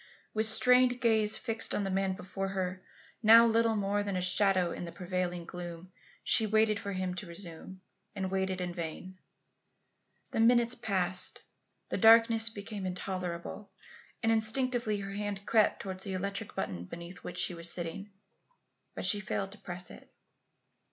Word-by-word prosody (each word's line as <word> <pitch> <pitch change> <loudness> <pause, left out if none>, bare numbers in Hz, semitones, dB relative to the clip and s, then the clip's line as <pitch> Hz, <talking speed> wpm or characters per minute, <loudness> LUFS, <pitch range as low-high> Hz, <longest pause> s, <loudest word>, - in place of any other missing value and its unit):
With 220 0 0
strained 250 +2 +4
gaze 220 -3 +3
fixed 225 -2 -1
on 205 - 0
the 195 - -2
man 190 0 0
before 190 +1 -5
her, 185 -1 -3 0.4
now 230 +1 +8
little 230 0 +2
more 205 0 0
than 200 -2 -3
a 180 - -1
shadow 185 -1 +3
in - - -5
the 170 - -7
prevailing 180 -1 -3
gloom, 175 +1 -8 0.3
she 220 - +3
waited 215 0 +2
for 200 0 -5
him 185 -1 -2
to 180 +1 -6
resume, 170 +1 -8 0.3
and 190 -2 -3
waited 190 -1 -1
in 175 -1 -3
vain. 180 +2 -7 1.1
The - - -2
minutes 240 +1 +4
passed, 190 -6 +1 0.5
the - - -2
darkness 225 0 +6
became 205 -2 -6
intolerable, 185 +1 -5 0.5
and 225 - +3
instinctively 225 -1 +1
her 195 0 -5
hand 205 -1 -4
crept 220 -2 +2
towards 190 -1 -4
the 195 - -4
electric 200 +3 -4
button 90 - -4
beneath 170 - -9
which 180 - -7
she 180 0 +1
was 170 0 -4
sitting. 175 +4 -4 0.9
But - - -4
she 205 - +3
failed 195 -1 -3
to 210 - -12
press 175 0 -5
it. - - -14
195 Hz, 160 wpm, -31 LUFS, 180-220 Hz, 1.1 s, now